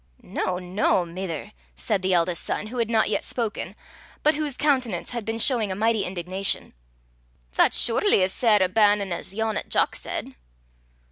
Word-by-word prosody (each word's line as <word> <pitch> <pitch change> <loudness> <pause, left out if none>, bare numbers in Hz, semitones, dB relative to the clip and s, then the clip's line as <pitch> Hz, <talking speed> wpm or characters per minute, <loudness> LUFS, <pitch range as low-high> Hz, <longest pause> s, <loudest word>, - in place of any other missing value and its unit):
"Noo, 180 -1 -2
noo, 180 0 +1
mither!" 170 -2 -6 0.2
said 185 - -1
the 190 0 0
eldest 175 -1 +1
son, - - -2
who 240 +3 -6
had 230 -1 0
not 225 -1 +3
yet - - 0
spoken, 230 -4 -3 0.5
but 305 - +5
whose 295 -3 -3
countenance 255 - 0
had 235 -3 -4
been 225 +1 -2
showing 230 -4 +2
a - - -2
mighty 220 +1 +1
indignation, 185 +2 -3 0.8
"that's - - +4
surely 235 - +4
as 185 - 0
sair 215 -5 +4
a - - +3
bannin' 205 -1 +3
as 180 +3 -3
yon 220 0 -1
'at - - -5
Jock - - +1
said." - - -5
205 Hz, 175 wpm, -24 LUFS, 185-230 Hz, 0.8 s, but